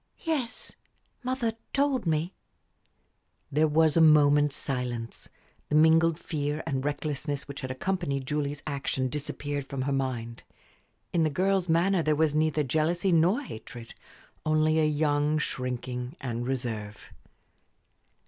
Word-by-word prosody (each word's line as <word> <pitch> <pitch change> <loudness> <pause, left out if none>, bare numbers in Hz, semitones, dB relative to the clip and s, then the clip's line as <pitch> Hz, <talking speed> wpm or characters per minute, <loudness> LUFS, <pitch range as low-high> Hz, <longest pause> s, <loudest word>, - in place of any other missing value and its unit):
"Yes, 285 -8 -2 0.5
mother 255 -3 -1 0.2
told 275 -7 +1
me." 160 +3 0 1.2
There 155 +3 +3
was 155 0 +3
a 165 - +5
moment's 145 -2 +5
silence. 125 -5 -3 0.4
The 150 - +1
mingled 160 +1 +5
fear 150 -2 -3
and 135 -1 -2
recklessness 145 -1 -3
which 140 -1 -7
had 130 - -4
accompanied 140 -1 -2
Julie's 145 0 -2
action 135 -3 -2
disappeared 145 0 -4
from 135 -2 -3
her 140 - -1
mind. 125 -4 -2 0.7
In 170 - +3
the 155 - +2
girl's 185 +3 +1
manner 175 +3 +3
there 155 -1 +2
was 155 -1 +2
neither 155 0 +2
jealousy 160 +7 +1
nor 175 - +3
hatred, 115 - -9 0.5
only 155 0 +2
a 155 - +3
young 150 0 +1
shrinking 125 -2 -3
and 120 -1 -3
reserve. 115 -5 -4
150 Hz, 130 wpm, -28 LUFS, 135-160 Hz, 1.2 s, a